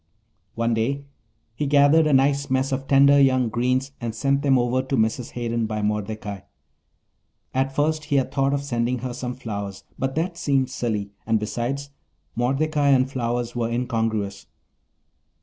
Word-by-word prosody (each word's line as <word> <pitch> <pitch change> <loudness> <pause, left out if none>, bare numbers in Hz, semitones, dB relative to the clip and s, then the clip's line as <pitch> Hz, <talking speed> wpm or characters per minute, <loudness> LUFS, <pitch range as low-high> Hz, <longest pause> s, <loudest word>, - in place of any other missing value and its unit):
One 115 0 +1
day 135 +6 -1 0.5
he 145 +5 -2
gathered 145 +3 +5
a 150 - +2
nice 140 +1 +3
mess 130 +1 +1
of 135 0 -2
tender 140 +1 +6
young 130 -3 +3
greens 130 +4 0
and 115 -2 -3
sent 140 +3 +1
them 135 -2 +3
over 125 +1 +1
to 130 +1 -2
Mrs. 110 +2 0
Hayden 115 -2 -1
by 110 -1 -3
Mordecai. 105 -1 -3 1.1
At 135 +1 0
first 155 +1 0
he 145 - -1
had 135 -2 +1
thought 135 0 +1
of 140 - -3
sending 120 -2 -1
her 125 - -3
some 125 0 -4
flowers, 100 -6 -6 0.2
but 135 0 -1
that 170 +2 -1
seemed 135 -4 +1
silly, 105 -4 -2 0.2
and 110 -1 +2
besides, 120 +7 -3 0.4
Mordecai 140 +5 +1
and 135 -1 +4
flowers 120 -1 -2
were 115 -1 -1
incongruous. 115 -5 -2
130 Hz, 160 wpm, -23 LUFS, 115-140 Hz, 1.1 s, tender